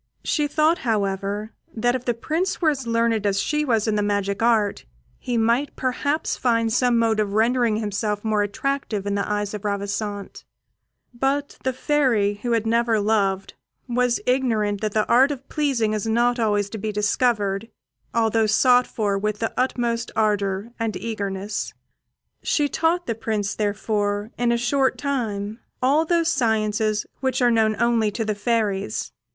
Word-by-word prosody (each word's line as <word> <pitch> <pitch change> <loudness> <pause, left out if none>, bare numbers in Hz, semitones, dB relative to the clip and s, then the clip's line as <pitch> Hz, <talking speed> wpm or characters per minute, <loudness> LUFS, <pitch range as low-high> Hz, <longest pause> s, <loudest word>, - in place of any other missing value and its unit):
She 300 -2 +1
thought, 310 +3 +2
however, 205 -1 -1 0.2
that 240 +2 +1
if 250 -1 -3
the 240 - 0
Prince 325 +10 -2
were 320 -3 +3
as 265 -4 -5
learned 230 -2 +1
as 200 0 +1
she 300 +7 0
was 230 -6 +1
in 220 - +1
the 210 - +1
magic 205 -1 -1
art, 225 -3 +2 0.4
he 245 -1 -2
might 235 +5 +1
perhaps 285 +4 -1
find 230 -3 +1
some 245 -1 +3
mode 225 -1 +2
of 205 -2 0
rendering 230 0 +2
himself 210 -1 -2
more 215 -1 +2
attractive 210 0 -2
in 200 - -1
the 200 +1 -1
eyes 205 0 -1
of 210 -1 -6
Ravissante; 205 0 -3 0.7
but 275 +4 -1
the 260 - +1
Fairy, 250 -7 +1
who 240 -1 0
had 225 -1 +1
never 230 0 +2
loved, 200 -2 0 0.3
was 245 0 +1
ignorant 225 -6 +1
that 215 -2 -2
the 215 -1 +1
art 260 +4 +5
of 275 -2 -6
pleasing 260 -8 0
is 215 0 -2
not 240 +2 +2
always 205 -3 +1
to 220 - -5
be 215 +2 -2
discovered, 210 0 0 0.4
although 225 -1 +2
sought 250 +3 +4
for 205 -3 -1
with 210 +1 -1
the 225 +1 -2
utmost 240 -2 -1
ardour 205 0 0
and 225 -4 -2
eagerness. 200 -1 -4 0.7
She 295 -2 +1
taught 335 +4 0
the 230 - -1
Prince, 215 -2 -2
therefore, 205 0 -1
in 240 -1 +1
a 235 - +2
short 265 +3 +1
time, 220 -6 -3 0.2
all 285 +5 +3
those 335 0 +2
sciences 215 -4 +1
which 260 -1 0
are 245 -2 +4
known 220 -1 +3
only 235 -2 +2
to 220 +2 -3
the 215 - 0
fairies. 205 - -1
225 Hz, 165 wpm, -23 LUFS, 205-245 Hz, 0.7 s, art